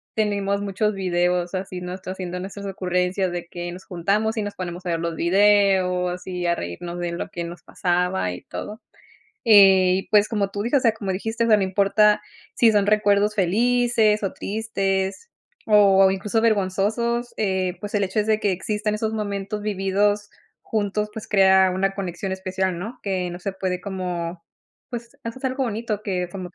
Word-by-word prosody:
tenemos 200 -2 0
muchos 205 +1 0
videos 180 -1 0
así 185 -1 -5
nosotros 185 +1 -6
haciendo 180 -1 -5
nuestras 200 +2 -7
ocurrencias 180 0 -1
de 175 -1 -5
que 175 0 -6
nos 185 +1 -10
juntamos, 205 +6 0
y 215 - 0
nos 205 0 -5
ponemos 180 0 -6
a - - -2
ver 165 - 0
los 170 -1 -2
videos, 185 -1 +3
y 180 -1 -3
a 170 - +2
reírnos 170 - -6
de 175 -1 -2
lo 170 - -4
que 170 - -5
nos 170 +1 -9
pasaba 180 - 0
y 90 - -9
todo. 215 +3 -7 0.6
Y 190 -4 +6
pues 210 -1 +5
como 205 -3 0
tú 205 +1 -3
dices, 245 +6 +2
o - - -10
sea, 230 - +4
como 205 -3 -4
dijiste, 225 +5 -2
o - - 0
sea, 215 -2 +6
no - - 0
importa 200 +2 +3 0.3
sí 230 -2 +5
son 205 -2 +2
recuerdos 210 0 +3
felices 225 +2 +2
o 195 - -1
tristes, 195 - -2 0.4
o 195 -2 +6
incluso, 205 +3 -1
vergonzosos, 220 +3 0
eh, 190 -3 -1
pues, 205 0 -7
el 205 - +2
hecho 205 +3 -1
es 210 - -2
de 215 -1 +2
que 205 -2 +1
existan 210 +3 -2
esos 220 +1 -2
momentos 205 -1 -3
vividos 205 0 0 0.3
juntos, 210 -1 -2
pues 220 0 -8
crea 190 -2 +5
una 195 +1 0
conexión 190 0 -4
especial, 190 -1 -2
¿no? 225 +8 -7
Que 185 -3 -1
no 175 - -7
se 195 +2 -4
puede 185 -1 -2
como, 180 -3 -4 0.5
pues, 235 -1 -7
haces 230 +4 -7
algo 260 +1 0
bonito 220 -2 -3
que 180 -3 -2
como 180 -1 -7
195 Hz, 180 wpm, -23 LUFS, 180-210 Hz, 0.6 s, Y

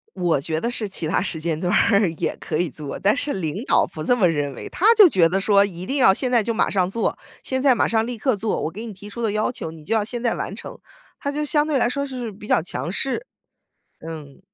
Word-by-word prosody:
我 175 -6 +1
觉 160 +2 -2
得 235 - -1
是 225 -3 -2
其 175 -4 -3
他 165 - +1
时 170 -4 -2
间 160 -1 -2
段 180 0 0
儿 200 -3 +4
也 - - -2
可 - - -3
以 175 0 +1
做， 150 -3 -7
但 205 +7 +2
是 285 0 -1
领 185 +3 -3
导 - - +3
不 155 - -8
这 245 +10 +2
么 190 -6 +4
认 145 -4 -1
为。 - - -8
他 390 - -1
就 415 -4 +9
觉 175 - +4
得 190 +3 0
说， 200 0 +4
一 185 -2 -5
定 275 +1 -1
要 190 -7 +6
现 250 +5 -2
在 235 -3 +4
就 230 - -1
马 220 - +1
上 185 -3 +1
做， 230 +3 -1 0.3
现 260 0 -2
在 270 -3 +5
马 - - +2
上 225 -1 +1
立 245 -2 -5
刻 260 +1 +1
做， 210 +2 -2
我 155 - -2
给 215 +7 -8
你 220 - -7
提 200 +2 -11
出 235 +3 -7
的 220 - +1
要 215 +3 0
求， 160 - -6
你 160 -1 -13
就 225 - -1
要 215 -2 +2
现 240 +1 -5
在 235 -2 +1
完 - - -4
成。 - - -9 0.4
他 280 - -2
就 300 +1 -2
相 295 +1 +2
对 295 -3 +1
来 240 - +2
说 280 +3 -2
是 250 -5 -5
比 205 +2 -12
较 - - +4
强 165 0 -4
势， 270 - -2 0.8
嗯。 150 -4 -9
205 Hz, 295 characters per minute, -22 LUFS, 170-245 Hz, 0.8 s, 就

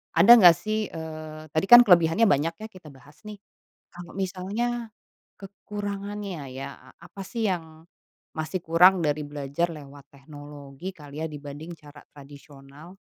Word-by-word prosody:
ada 180 +8 +6
nggak 175 -4 +8
sih, 215 +4 -3
eee, 155 -1 -9
tadi 160 +3 0
kan 240 0 +10
kelebihannya 175 +1 +4
banyak 165 -2 +2
ya 215 +4 -9
kita 180 -4 -15
bahas, 145 - -17
nih. 210 - -8 0.6
Kalau 175 -1 -11
misalnya 210 +5 -4 0.5
kekurangannya 200 -5 -7
ya, 130 +1 -7
e 130 - -20
apa 175 +3 -11
sih 225 +2 -3
yang 160 -3 -5 0.5
masih 155 +4 -4
kurang 180 +3 +5
dari 150 +1 -1
belajar 145 +3 -3
lewat 145 -2 -12
teknologi 145 +3 -11
kali 150 -3 -10
ya - - -2
dibanding 145 +2 -9
cara 145 -1 -16
tradisional? 145 +4 -15
165 Hz, 140 wpm, -25 LUFS, 145-195 Hz, 0.6 s, kan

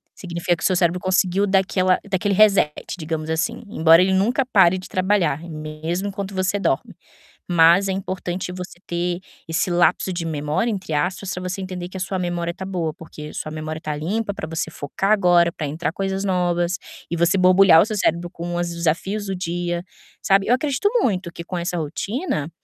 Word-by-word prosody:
Significa 175 -1 -1
que - - -9
o - - +1
seu 185 - +1
cérebro 175 0 +2
conseguiu 185 +1 +1
dar 195 0 +4
aquela 185 -1 +2
dar 195 - -1
aquele 200 +2 0
reset, 200 -7 +5 0.3
digamos 155 -1 -4
assim, 165 +9 -1
embora 165 -3 +6
ele 190 +1 +2
nunca 235 +8 +2
pare 190 -6 +4
de 185 - -8
trabalhar, 185 -5 +1
mesmo 160 +3 -4
enquanto 195 0 -5
você 185 +2 0
dorme. 165 -8 -1 0.5
Mas 175 +3 +5
é 190 - 0
importante 185 -1 -4
você 180 -1 -8
ter 175 +1 -2 0.3
esse 165 +2 0
"lapso 175 +2 +2
de 170 -1 -3
memória", 155 +8 -1
entre 190 -6 -4
aspas, 185 +5 -1
pra 180 - -6
você 190 +2 -4
entender 180 -1 -5
que - - -8
a - - -7
sua 190 0 -2
memória 175 -1 -2
tá 190 - -7
boa, 170 -5 -2
porque 150 -2 -10
sua 155 - -5
memória 155 0 -5
tá 150 - -3
limpa 200 +8 -2
pra 155 - -6
você 160 0 -3
focar 190 +8 -1
agora, 175 -4 +4
pra 155 - -4
entrar 155 +2 -3
coisas 195 +1 -2
novas 175 -1 0 0.3
e 170 - -1
você 170 +3 +3
borbulhar 185 -2 +7
o - - 0
seu 215 -1 -3
cérebro 170 0 0
com 175 +1 -5
os 175 0 -1
desafios 175 +5 -1
do 195 - -3
dia, 175 0 -3 0.4
sabe? 195 0 +3
Eu 245 - +5
acredito 280 +7 +1
muito 185 -5 0
que 170 - -8
com 180 +1 -5
essa 175 +1 -2
rotina 165 - -3
180 Hz, 200 wpm, -22 LUFS, 165-195 Hz, 0.5 s, borbulhar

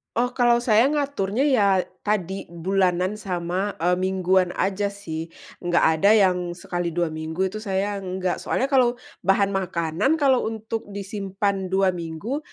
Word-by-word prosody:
Oh, 245 +2 +1
kalau 240 -1 +3
saya 230 +2 +4
ngaturnya 275 -6 0
ya, 255 -9 +3 0.3
tadi, 195 -2 -2
bulanan 185 +3 0
sama, 185 +1 -2
e 175 +2 +1
mingguan 185 -1 +2
aja 200 +1 0
sih, 165 -5 -6 0.3
enggak 175 -1 +1 0.2
ada 200 - +5
yang 190 -3 +4 0.2
sekali 175 0 -3
2 170 -2 0
minggu 160 +3 -3
itu 215 - -5
saya, 200 -1 -2
enggak. 185 -1 -2
Soalnya 270 +2 -1
kalau 250 -2 +4 0.3
bahan 195 +1 +2
makanan 185 - 0
kalau 270 -6 +2
untuk 220 0 -5
disimpan 195 -1 -3
2 190 0 +3
minggu. 170 - -4
195 Hz, 145 wpm, -24 LUFS, 180-215 Hz, 0.3 s, ada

